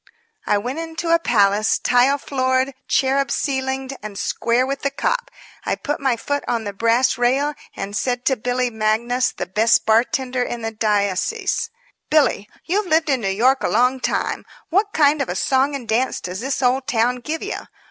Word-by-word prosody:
I 205 - +3
went 250 +9 -4
into 330 0 -2
a 335 - +5
palace, 210 -6 +2
tile 250 +3 +3
floored, 260 -1 0
cherub 275 +1 +2
ceilinged 265 -1 -2
and 210 -1 -7
square 235 +4 0
with 275 +1 -3
the 280 - 0
cop. - - -1 0.3
I - - -1
put 295 -1 -3
my 265 -3 +1
foot 285 +5 -2
on 230 -2 -1
the 205 -1 -5
brass 230 +4 +2
rail 270 +5 +2 0.2
and 200 +1 -5
said 245 +2 -1
to 265 - +3
Billy 245 +1 -1
Magnus, 225 +3 0
the - - -5
best 215 +5 +2
bartender 250 +3 +1
in 240 -1 -3
the 225 - -2
diocese: 215 - 0 0.4
"Billy, 285 -9 +2 0.2
you've 395 +3 0
lived 320 -1 +2
in 260 -3 +1
New 195 - -1
York 250 +7 +2
a - - 0
long 250 +4 +2
time - - -1 0.3
what 405 +4 +2
kind 295 -3 +3
of 270 - -2
a 180 - -2
song 265 +6 +1
and 255 -4 -7
dance 240 +4 0
does 180 +1 -6
this 270 +2 -2
old 260 +2 +1
town 245 -1 +1
give 305 +6 -4
you? - - -5
255 Hz, 185 wpm, -21 LUFS, 225-275 Hz, 0.4 s, a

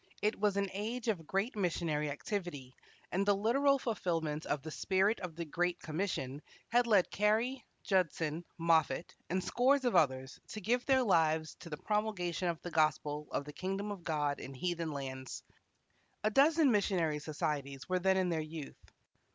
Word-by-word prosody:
It 210 0 +1
was 205 -1 +2
an 200 0 +1
age 225 +4 -3
of 165 -8 -2
great 195 +6 0
missionary 165 -6 0
activity, 145 -4 -4 0.4
and 190 +2 +1
the 200 0 +4
literal 275 +7 +3
fulfilment 165 - -2
of 145 -2 -1
the 155 - -6
spirit 195 +6 +2
of 175 -4 -6
the 170 0 -4
great 175 +3 -1
commission 155 -5 -3 0.3
had 240 +1 +3
led 205 -5 +4
Carey, 225 +5 +1 0.2
Judson, 170 -5 0
Moffat, 165 0 +2 0.2
and 185 +1 0
scores 260 +6 +3
of 245 - +2
others 130 -5 +2
to 215 - -6
give 240 +5 +1
their 265 -2 +5
lives 160 -6 +2
to 170 - -10
the 150 - -5
promulgation 190 -5 -1
of 170 -2 -1
the 175 - -5
gospel 155 -1 +1
of 140 - -2
the 150 - -8
kingdom 195 +4 -3
of 195 -4 -7
God 145 -3 0
in 135 - -8
heathen 170 +1 -2
lands. 130 -2 -5 0.8
A 215 - +2
dozen 295 +3 +5
missionary 180 -7 +1
societies 145 -3 -3
were 185 0 +1
then 190 +1 +3
in 185 -1 +2
their 165 -2 0
youth. 155 -1 -9
175 Hz, 170 wpm, -34 LUFS, 155-210 Hz, 0.8 s, their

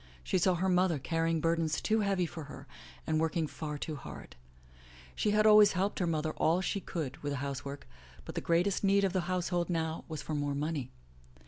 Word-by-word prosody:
She 185 - +1
saw 180 +1 +3
her 185 +2 0
mother 180 -3 +3
carrying 165 +3 0
burdens 165 -2 +1
too 220 0 +1
heavy 195 -3 +1
for 160 -2 -7
her 140 -1 -10 0.4
and 155 0 +1
working 160 0 0
far 150 0 -5
too 155 +1 -4
hard. 95 - -10 0.8
She - - +1
had 210 +1 +3
always 210 -1 +7
helped 190 +2 -1
her 180 - +1
mother 155 -1 0
all 165 +3 +3
she 195 +2 -1
could 155 -8 -4
with 145 -1 -3
the - - -2
housework, 140 - -5 0.4
but - - -7
the - - -3
greatest 175 +5 +1
need 200 0 +4
of 190 -2 +1
the 185 -2 -1
household 175 -1 0
now 160 -2 -1
was 155 -3 -5
for 155 - -4
more 145 -1 -1
money. 145 -3 -2
165 Hz, 205 wpm, -31 LUFS, 150-185 Hz, 0.8 s, always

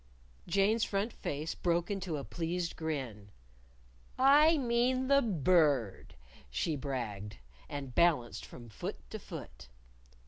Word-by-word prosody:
_" - - -12
Jane's 205 +3 +3
front 200 +3 -1
face 150 +3 -4
broke 170 +2 0
into 185 -5 -2
a 140 - -5
pleased 170 +2 -3
grin. 130 -11 -4 0.9
"I 295 +5 +6
mean 255 0 +1
the 280 0 +6
Bird," 150 - +2 0.3
she 60 - -1
bragged 110 -8 -4 0.3
And 140 -3 -6
balanced 150 -8 +2
from 120 -1 -11
foot 100 - -7
to - - -5
foot. - - -9
165 Hz, 125 wpm, -32 LUFS, 130-215 Hz, 0.9 s, I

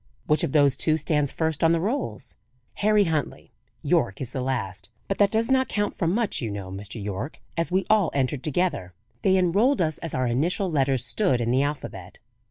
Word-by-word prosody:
"Which 150 - +2
of - - 0
those 145 -3 +4
two 155 -1 +2
stands 150 -3 0
first 160 -1 -1
on 165 0 +5
the 165 - +2
rolls?" 185 - -3 0.5
"Harry 210 0 +4
Huntley. 160 -6 -3 0.3
Yorke 95 - +1
is 130 - -5
the 130 - -2
last. 100 -8 -3 0.2
But 195 - -2
that 205 -1 +5
does 225 +4 0
not 260 0 +3
count 205 -1 -1
for 170 - -1
much, 210 +2 0
you 115 - -2
know, 100 -2 -6
Mr. 100 +4 -7
Yorke, 105 +8 -5 0.2
as 165 +1 -1
we 190 +1 +1
all 210 -5 +3
entered 135 0 0
together. 150 - -1 0.3
They 190 -1 +3
enrolled 200 +10 +3
us 155 -3 0
as 165 - -4
our 130 - 0
initial 170 +10 0
letters 135 -4 +1
stood 125 +1 +1
in 120 0 0
the 130 +2 +3
alphabet." 145 +1 -5
150 Hz, 200 wpm, -25 LUFS, 125-185 Hz, 0.5 s, on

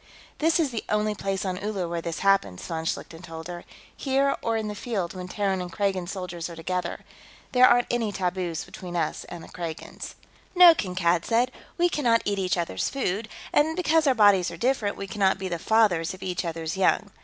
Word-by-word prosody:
"This 320 +2 +3
is 300 -5 +1
the 230 - -3
only 210 0 +1
place 195 -1 -3
on 185 +1 -3
Uller 200 -4 -2
where 170 0 -3
this 165 0 -4
happens," 195 - +2
von 160 -1 -4
Schlichten 165 0 -4
told 165 -2 -8
her. 175 -1 -7 0.3
"Here, 275 0 +1
or 225 -1 0
in 220 -1 -2
the 210 - -3
field 200 -5 -3
when 180 -1 -6
Terran 195 -1 -1
and 180 -1 -6
Kragan 190 -2 -1
soldiers 180 -3 -5
are 170 - -8
together. 175 +2 -3 0.5
There 255 -1 +7
aren't 245 0 +4
any 230 -3 0
taboos 180 -3 -2
between 175 -1 -8
us 165 -3 -1
and 170 -1 -9
the - - -11
Kragans." 170 -2 -7 0.4
"No," 355 -1 +10
Kankad 180 - 0
said. 240 +2 +2 0.3
"We 350 0 +4
cannot 240 -9 +2
eat 200 -1 0
each 185 -1 0
others' 170 - -1
food, 220 -5 -2 0.2
and 315 +2 +3
because 325 -3 +2
our 265 - +4
bodies 200 -5 +5
are 170 - -8
different, 230 -1 0
we 195 - -4
cannot 195 0 +1
be 190 - -4
the 170 -1 -3
fathers 185 -5 +2
of 185 - -11
each 180 -1 -2
others' 165 0 -3
young. 200 +2 +2
190 Hz, 205 wpm, -26 LUFS, 175-230 Hz, 0.5 s, No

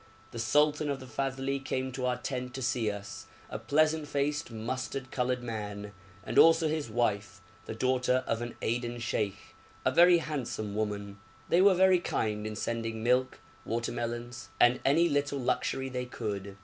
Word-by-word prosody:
The 120 - -6
sultan 150 +6 +2
of 140 -1 -2
the 130 - -9
Fadhli 135 +1 -2
came 130 0 -2
to 130 0 -2
our 125 - 0
tent 125 -1 -4
to 130 - -4
see 120 -3 +1
us 100 0 -7 0.2
a 110 - -4
pleasant 155 +6 +2
faced 145 +1 -1
mustard 130 +3 -4
coloured 125 -1 -1
man; 105 -3 -5 0.3
and - - +1
also 165 0 +6
his 155 -4 -2
wife, 100 -3 -1 0.3
the - - -5
daughter 130 +1 +1
of 115 0 -1
an 120 0 -5
Aden 120 +1 -1
sheikh, 105 -3 -3 0.3
a 130 - +4
very 175 +4 +7
handsome 130 -10 -3
woman. 100 -1 -3 0.3
They 175 - +5
were 195 -1 +6
very 185 0 +5
kind 105 -9 -2
in 110 - -5
sending 115 0 -3
milk, 125 +2 +1 0.2
watermelons, 120 +1 -4
and 120 +1 +5
any 160 +5 +4
little 145 -2 0
luxury 130 +1 -1
they 125 -1 -3
could. 100 -4 -5
125 Hz, 165 wpm, -30 LUFS, 110-140 Hz, 0.3 s, very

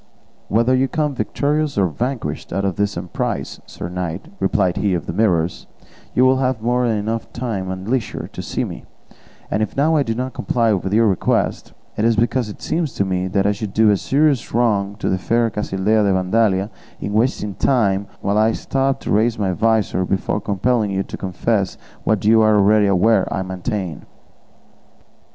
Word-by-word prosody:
"Whether 115 +5 +3
you 130 +1 +2
come 150 0 -1
victorious 145 +6 -1
or 100 - +4
vanquished 120 - -3
out 100 - -1
of 95 - -1
this 100 -2 -1
emprise, 90 0 -3
sir - - -7
knight," 90 - -5
replied 95 -6 +1
he 100 -3 +1
of 85 - -3
the - - -4
Mirrors, 90 -5 0 0.5
"you 125 - +5
will 130 0 +4
have 130 -2 0
more 120 +2 +1
than 110 -2 +1
enough 110 +2 -3
time 110 -7 -3
and 95 +1 -5
leisure 120 -3 -2
to - - -5
see - - -2
me; - - -7 0.7
and 110 - 0
if 110 - -3
now 155 +3 +3
I 150 - +3
do 115 -4 -1
not 130 +2 -3
comply 115 -3 +1
with 95 -1 -2
your 115 +2 +4
request, 95 -4 0 0.2
it 105 - 0
is 115 0 +3
because 120 +1 +1
it 105 - -10
seems 160 -4 -1
to 100 - +1
me 95 0 -1
I 100 +1 +2
should 105 -1 -5
do 110 -1 +5
a - - +4
serious 140 +2 +1
wrong 105 -4 +1
to - - -4
the 95 - +1
fair 115 +4 +1
Casildea 105 +1 0
de 100 -1 +2
Vandalia 95 +1 +1 0.3
in 100 - -4
wasting 110 -2 0
time 100 -5 +1
while 100 +1 +1
I 110 +1 +3
stopped 135 +2 -1
to - - -3
raise 110 +3 +2
my 100 -3 0
visor 110 0 +1
before 95 +2 -1
compelling 105 +3 0
you 95 0 -1
to - - -8
confess 95 +1 -1 0.3
what 110 -2 +1
you 110 +1 +6
are 110 -1 +4
already 105 +1 +4
aware 100 +2 +3
I 95 - -1
maintain." 95 - -4
105 Hz, 190 wpm, -20 LUFS, 95-120 Hz, 0.7 s, you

